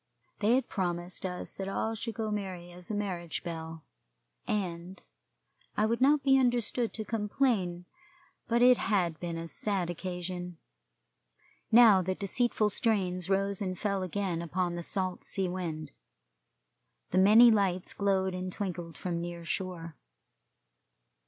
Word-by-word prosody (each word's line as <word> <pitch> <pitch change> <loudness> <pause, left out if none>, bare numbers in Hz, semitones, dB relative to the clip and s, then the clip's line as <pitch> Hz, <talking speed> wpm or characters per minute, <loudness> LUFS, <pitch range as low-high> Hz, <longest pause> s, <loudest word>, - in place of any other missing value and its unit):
They 220 +3 +4
had 260 -1 0
promised 180 -1 -3
us 180 -1 -5
that 195 0 -5
all 220 +3 -1
should 225 0 -5
go 220 -2 -2
merry 185 -4 -4
as 175 0 -10
a 215 - -2
marriage 180 -5 -3
bell, 165 -2 -6 0.6
and 180 -2 -3 0.8
I 210 - +3
would 230 +3 0
not 280 +1 +4
be 270 -1 +5
understood 240 -2 +1
to 220 - -3
complain, 210 -5 0 0.6
but 235 +1 +3
it 250 0 +7
had 175 -6 0
been 170 -1 -4
a 165 0 -5
sad 185 -1 -1
occasion. 180 0 -5 1.1
Now 225 -4 +8
the 185 +1 -2
deceitful 215 +1 +1
strains 185 -5 0
rose 195 0 0
and 185 -2 -2
fell 200 -1 -1
again 185 -2 -2
upon 175 +1 -1
the 175 - -4
salt 185 +1 -1
sea 190 -1 0
wind. 165 -5 -4 1.2
The 185 - +3
many 220 +5 +8
lights 190 -4 +1
glowed 190 -2 +1
and 185 0 -4
twinkled 175 -4 -5
from 175 -2 -3
the - - -3
near 170 0 -6
shore. 170 -3 -4
185 Hz, 145 wpm, -30 LUFS, 175-210 Hz, 1.2 s, Now